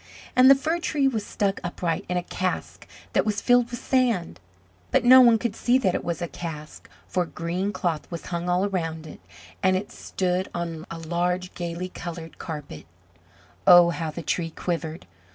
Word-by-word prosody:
And 255 Hz, +1 st, +7 dB
the 275 Hz, -, +9 dB
Fir 320 Hz, +5 st, -1 dB
tree 295 Hz, -5 st, +1 dB
was 225 Hz, -6 st, -1 dB
stuck 200 Hz, -2 st, -1 dB
upright 175 Hz, -2 st, -2 dB
in 180 Hz, -, 0 dB
a 175 Hz, -, -1 dB
cask 185 Hz, +1 st, -4 dB, 0.3 s
that -, -, +3 dB
was 210 Hz, -1 st, -1 dB
filled 245 Hz, -1 st, +3 dB
with 240 Hz, -1 st, -6 dB
sand: 235 Hz, -, 0 dB, 0.5 s
but -, -, +2 dB
no 255 Hz, +1 st, +9 dB
one 235 Hz, -2 st, +6 dB
could 235 Hz, -1 st, -3 dB
see 245 Hz, +1 st, +3 dB
that 195 Hz, -9 st, +1 dB
it -, -, -2 dB
was 170 Hz, 0 st, -3 dB
a -, -, -2 dB
cask, 155 Hz, -3 st, -8 dB, 0.2 s
for 180 Hz, -, 0 dB
green 175 Hz, +4 st, -3 dB
cloth 170 Hz, -5 st, -2 dB
was 170 Hz, -2 st, -7 dB
hung 170 Hz, +1 st, -2 dB
all 180 Hz, +2 st, +2 dB
around 165 Hz, -5 st, -3 dB
it, 155 Hz, -, -11 dB, 0.4 s
and 185 Hz, -1 st, +3 dB
it 205 Hz, +2 st, -6 dB
stood 185 Hz, 0 st, -2 dB
on 165 Hz, -2 st, -4 dB
a 165 Hz, -, -6 dB
large 175 Hz, +2 st, -2 dB
gayly 175 Hz, +1 st, -4 dB
coloured 165 Hz, -2 st, -8 dB
carpet. 150 Hz, -, -7 dB, 0.8 s
Oh, 175 Hz, -2 st, +8 dB
how 165 Hz, -2 st, -3 dB
the 165 Hz, +2 st, -7 dB
Tree 165 Hz, +2 st, -1 dB
quivered! 165 Hz, -1 st, -4 dB
180 Hz, 185 wpm, -25 LUFS, 170-205 Hz, 0.8 s, the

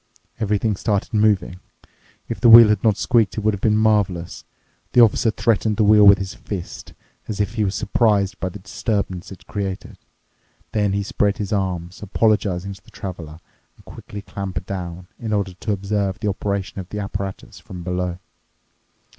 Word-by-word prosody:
Everything 105 Hz, -1 st, 0 dB
started 100 Hz, +2 st, -1 dB
moving. 105 Hz, -4 st, +2 dB, 0.7 s
If -, -, -5 dB
the 120 Hz, -, +6 dB
wheel 115 Hz, -1 st, +10 dB
had 105 Hz, -, +1 dB
not 110 Hz, -3 st, +3 dB
squeaked, 115 Hz, -5 st, +1 dB
it -, -, -1 dB
would 110 Hz, 0 st, +2 dB
have 100 Hz, -, -5 dB
been 105 Hz, -1 st, +3 dB
marvelous. 100 Hz, -6 st, 0 dB, 0.5 s
The -, -, +5 dB
officer 115 Hz, 0 st, +4 dB
threatened 110 Hz, -1 st, +1 dB
the 110 Hz, -, +3 dB
wheel 105 Hz, 0 st, +6 dB
with 100 Hz, 0 st, +8 dB
his 95 Hz, -1 st, -5 dB
fist, 95 Hz, -4 st, -7 dB, 0.3 s
as 105 Hz, -2 st, -5 dB
if 105 Hz, -, -1 dB
he 110 Hz, -2 st, 0 dB
was 100 Hz, -1 st, -1 dB
surprised 100 Hz, -4 st, +1 dB
by 95 Hz, -, -2 dB
the 95 Hz, -, -9 dB
disturbance 95 Hz, -2 st, -3 dB
it 95 Hz, -, -12 dB
created. 100 Hz, -2 st, -5 dB, 0.7 s
Then 105 Hz, -2 st, +1 dB
he 100 Hz, 0 st, 0 dB
spread 105 Hz, -2 st, 0 dB
his 105 Hz, 0 st, -3 dB
arms, 90 Hz, -3 st, -3 dB
apologizing 100 Hz, -2 st, 0 dB
to 95 Hz, -, -16 dB
the -, -, -19 dB
traveler, 85 Hz, -5 st, -8 dB, 0.4 s
and -, -, -22 dB
quickly 100 Hz, -1 st, -9 dB
clambered 95 Hz, -3 st, -5 dB
down, 90 Hz, -2 st, -6 dB
in 110 Hz, -2 st, -3 dB
order 100 Hz, -3 st, -1 dB
to 105 Hz, +4 st, -4 dB
observe 100 Hz, -1 st, -1 dB
the 105 Hz, -, -1 dB
operation 100 Hz, 0 st, -3 dB
of 90 Hz, -1 st, -8 dB
the 105 Hz, -, -6 dB
apparatus 100 Hz, -1 st, -5 dB
from 90 Hz, 0 st, -9 dB
below. 90 Hz, 0 st, -2 dB
100 Hz, 175 wpm, -21 LUFS, 95-105 Hz, 0.7 s, wheel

